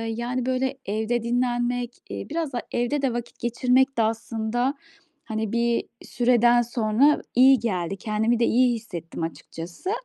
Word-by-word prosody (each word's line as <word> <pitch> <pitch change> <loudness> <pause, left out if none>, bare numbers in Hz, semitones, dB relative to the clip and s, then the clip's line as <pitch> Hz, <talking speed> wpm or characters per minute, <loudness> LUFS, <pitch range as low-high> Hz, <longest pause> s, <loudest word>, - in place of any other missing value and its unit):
yani 245 +2 -2
böyle, 260 +1 -1
evde 220 +3 -1
dinlenmek, 245 0 0 0.2
eee, - - -6
biraz 315 -2 -2
da, 240 - -2
evde 245 +4 0
de 270 -3 0
vakit 240 0 -6
geçirmek 255 +3 +2
de 230 - +3
aslında, 225 +3 -1 0.5
hani, 220 -1 -3
bir 235 0 +1 0.2
süreden 240 0 +3
sonra 235 +4 +2
iyi 260 +1 +7
geldi. 190 -4 -2
Kendimi 220 +3 0
de 235 - +4
iyi 245 0 +3
hissettim 175 -7 -7
açıkçası 165 - -6
240 Hz, 145 wpm, -24 LUFS, 220-250 Hz, 0.5 s, iyi